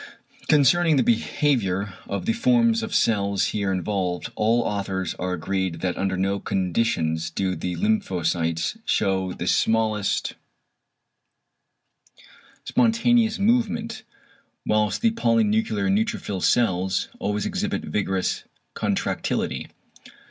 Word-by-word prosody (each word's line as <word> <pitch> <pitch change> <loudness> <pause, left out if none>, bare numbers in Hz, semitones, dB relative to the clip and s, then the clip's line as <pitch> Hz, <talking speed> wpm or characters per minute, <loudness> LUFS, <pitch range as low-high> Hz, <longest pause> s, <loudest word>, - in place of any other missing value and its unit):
Concerning 155 +3 +4
the 130 - +3
behaviour 110 -5 0
of 100 - -3
the 230 - +2
forms 235 -1 +3
of 225 -2 -5
cell 100 -3 +1
here 100 0 0
involved, 95 +1 -2
all 115 +2 +2
authors 95 -5 -2
are 90 0 -2
agreed 95 0 -2
that 90 -1 -1
under 95 -1 -1
no 100 +2 0
conditions 85 -5 0
do 95 +2 -1
the 90 +2 -3
lymphocytes 85 - 0
shew 95 -1 0
the - - -5
smallest 110 -2 +1 2.3
spontaneous 230 -1 +2
movement; 225 +1 0 0.6
whilst 105 -2 +1
the 230 0 +3
polynuclear 110 - +1
neutrophil 100 -1 -1
cells 95 -5 +1
always 105 0 -1
exhibit - - -2
vigorous 95 +2 -1 0.3
contractility. - - -2
105 Hz, 105 wpm, -24 LUFS, 95-145 Hz, 2.3 s, Concerning